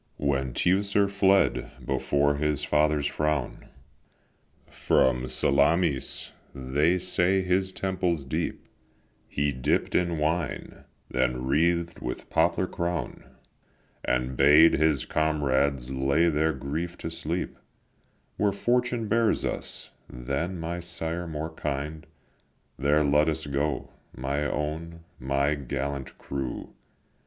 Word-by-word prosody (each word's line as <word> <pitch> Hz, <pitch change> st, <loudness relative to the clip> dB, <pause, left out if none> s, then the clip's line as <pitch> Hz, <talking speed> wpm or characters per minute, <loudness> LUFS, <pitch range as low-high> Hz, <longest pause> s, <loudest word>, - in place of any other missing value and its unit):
When 70 Hz, -3 st, 0 dB
Teucer 100 Hz, +2 st, +2 dB
fled 100 Hz, -1 st, +2 dB, 0.2 s
before 70 Hz, +2 st, +1 dB
his 75 Hz, -1 st, 0 dB
father's 75 Hz, -1 st, +2 dB
frown 75 Hz, -3 st, -1 dB, 1.0 s
From 65 Hz, -1 st, +1 dB
Salamis, 70 Hz, +3 st, +1 dB, 0.2 s
they 70 Hz, +7 st, +1 dB
say 90 Hz, +1 st, +1 dB
his 95 Hz, +1 st, +1 dB
temples 90 Hz, -5 st, -1 dB
deep 65 Hz, -, -3 dB, 0.6 s
He 70 Hz, 0 st, 0 dB
dipp'd 65 Hz, -1 st, 0 dB
in 85 Hz, -2 st, +1 dB
wine, 75 Hz, -2 st, -2 dB, 0.3 s
then 65 Hz, 0 st, 0 dB
wreath'd 85 Hz, +4 st, +1 dB
with -, -, -6 dB
poplar -, -, +2 dB
crown, 85 Hz, 0 st, -3 dB, 0.8 s
And 65 Hz, +1 st, 0 dB
bade 75 Hz, +5 st, +7 dB
his 75 Hz, -2 st, +2 dB
comrades 70 Hz, -4 st, 0 dB
lay 70 Hz, +6 st, +2 dB
their 80 Hz, +1 st, +2 dB
grief 75 Hz, +6 st, -4 dB
to 80 Hz, -, -5 dB
sleep: 85 Hz, +2 st, -3 dB, 0.8 s
"Where 105 Hz, -1 st, +2 dB
Fortune 120 Hz, +2 st, 0 dB
bears 115 Hz, +2 st, +2 dB
us, -, -, -3 dB, 0.2 s
than 70 Hz, +9 st, -3 dB
my 85 Hz, +2 st, -3 dB
sire 85 Hz, 0 st, -4 dB
more 80 Hz, 0 st, -4 dB
kind, 75 Hz, +2 st, -4 dB, 0.7 s
There 75 Hz, +3 st, +2 dB
let 75 Hz, +2 st, +3 dB
us 80 Hz, 0 st, -3 dB
go, 70 Hz, +1 st, -2 dB, 0.3 s
my 70 Hz, +3 st, -1 dB
own, 80 Hz, +3 st, -4 dB, 0.2 s
my 70 Hz, +3 st, +1 dB
gallant 70 Hz, -1 st, -4 dB
crew. 70 Hz, -2 st, -5 dB
75 Hz, 110 wpm, -27 LUFS, 70-85 Hz, 1.0 s, bade